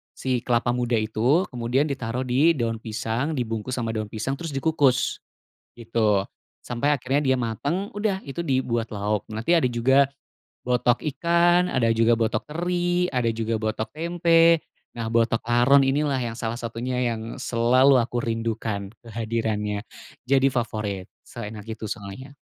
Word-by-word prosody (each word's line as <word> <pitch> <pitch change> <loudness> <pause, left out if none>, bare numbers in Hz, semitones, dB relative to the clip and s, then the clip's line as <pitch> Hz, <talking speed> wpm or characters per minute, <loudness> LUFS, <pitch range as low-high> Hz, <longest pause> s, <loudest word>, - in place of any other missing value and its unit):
si 130 -2 -1
kelapa 120 0 +1
muda 120 -1 0
itu. 115 - +2
Kemudian 125 +3 0
ditaruh 125 -1 -3
di 140 +7 +3
daun 115 -3 -2
pisang, 115 +7 -2
dibungkus 115 0 -3
sama 115 -3 -2
daun 110 -1 -3
pisang, 110 +5 -3
terus 165 -5 -5
dikukus 135 -3 +2 0.5
gitu. 110 -4 +1 0.4
Sampai 135 +5 0
akhirnya 135 +1 +1
dia - - 0
matang. 145 - -2
Udah, 205 -2 0
itu 170 +5 -5
dibuat 120 -5 -1
lauk. 105 0 -1
Nanti 120 +11 +2
ada 155 - +2
juga 130 +3 +4 0.6
botok 125 -1 +1
ikan, 175 +1 +3
ada 115 -6 +1
juga 115 +1 +3
botok 110 -1 -1
teri, 175 +2 0
ada 125 -3 0
juga 115 -1 -1
botok 110 0 -3
tempe. 165 0 +3 0.3
Nah, 115 -1 -4
botok 115 -1 +2
laron 125 +4 +5
inilah 140 0 +1 0.2
salah 115 0 -2
satunya 120 +2 -3
yang 115 0 -5
selalu 125 +3 +4
aku 120 0 -1
rindukan 115 -3 -2 0.2
kehadirannya. 110 -2 -2 0.4
Jadi 135 +1 +3
favorit, 110 -7 -3 0.2
seenak 105 +1 -8
itu 110 0 -6
soalnya. 105 +8 -7
120 Hz, 140 wpm, -24 LUFS, 115-140 Hz, 0.6 s, laron